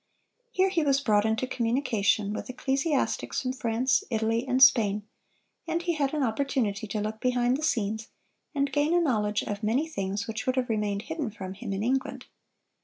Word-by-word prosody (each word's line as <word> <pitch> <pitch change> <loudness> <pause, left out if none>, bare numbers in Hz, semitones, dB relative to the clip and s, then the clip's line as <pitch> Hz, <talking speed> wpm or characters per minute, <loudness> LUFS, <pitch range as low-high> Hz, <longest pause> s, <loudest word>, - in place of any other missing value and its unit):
Here 385 -4 +2
he 365 -3 +1
was 275 -2 +3
brought 215 -5 +2
into 220 +3 0
communication 230 -5 0
with - - -5
ecclesiastics 275 +4 -1
from 255 0 -1
France, 250 +1 +1
Italy, 225 +1 0
and 255 0 +1
Spain, 215 -6 +5 0.6
and 330 0 0
he 345 -1 0
had 290 -2 0
an 295 - +1
opportunity 225 -4 -1
to 210 - -3
look 215 +1 -3
behind 250 0 +2
the 285 - -4
scenes, 220 -6 -1 0.5
and 280 -1 0
gain 295 +4 +2
a - - +5
knowledge 215 -10 +1
of 205 0 -4
many 240 +9 +1
things 200 -7 -3
which 220 +1 -5
would 255 - +2
have 255 -2 0
remained 210 -2 -1
hidden 315 -5 -3
from 190 -3 -7
him 200 0 -6
in 195 +1 -2
England. 260 +3 -1
240 Hz, 180 wpm, -27 LUFS, 215-275 Hz, 0.6 s, Spain